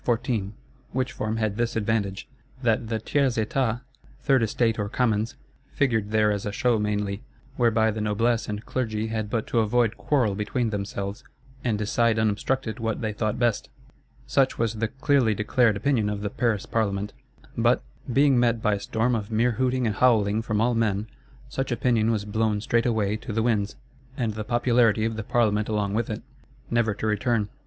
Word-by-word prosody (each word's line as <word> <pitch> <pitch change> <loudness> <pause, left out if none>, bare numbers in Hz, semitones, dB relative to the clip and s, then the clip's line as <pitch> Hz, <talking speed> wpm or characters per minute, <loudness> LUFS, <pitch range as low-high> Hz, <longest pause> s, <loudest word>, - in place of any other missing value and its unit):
Which 130 0 -1
form 110 +1 -3
had 110 -2 -1
this 120 0 -1
advantage, 105 -3 -1 0.4
that 115 -1 +1
the 110 0 -1
Tiers 130 +3 0
Etat, 115 +1 0 0.4
Third 135 -3 +4
Estate, 115 0 +1
or 105 -1 -1
Commons, 115 -2 0 0.4
figured 110 -7 +1
there 110 -1 +3
as 100 -1 -2
a 105 - -3
show 115 +2 +1
mainly: 105 -1 -1 0.3
whereby 115 -2 +3
the 110 0 -4
Noblesse 110 +3 +1
and 105 +1 -4
Clergy 110 -3 -2
had 110 -2 -2
but 110 0 -1
to 120 - 0
avoid 115 +1 +2
quarrel 125 -9 +1
between 110 +3 -1
themselves, 100 0 -4 0.4
and 115 -4 0
decide 110 +2 +1
unobstructed 110 +3 0
what 115 -1 -2
they 110 -2 -2
thought 110 +2 -1
best. 120 -3 0 0.6
Such 135 -1 +2
was 115 -1 0
the 115 0 -1
clearly 130 -2 +2
declared 105 +1 +2
opinion 115 -2 +1
of 105 -1 -3
the 105 -1 -3
Paris 110 -5 0
Parlement. 105 -2 -1 0.4
But, - - +2 0.3
being 135 0 +4
met 120 -1 +2
by 105 -1 +1
a 100 - -1
storm 115 +4 0
of 105 -3 -2
mere 115 +2 +2
hooting 130 +2 0
and 105 -2 0
howling 110 -4 +3
from 110 -2 -1
all 120 +2 +2
men, 110 -3 0 0.4
such 135 0 -3
opinion 120 -2 +2
was 110 -3 0
blown 105 0 0
straightway 110 -2 +1
to 110 - -7
the 110 +1 0
winds; 105 -4 0 0.4
and 115 -5 -1
the 110 +1 -4
popularity 120 -1 +2
of 115 0 -1
the 110 - -3
Parlement 110 -3 +1
along 105 -2 0
with 115 +1 -1
it,—never 110 +1 -3
to - - -4
return. 110 0 +1
110 Hz, 175 wpm, -25 LUFS, 105-120 Hz, 0.6 s, Third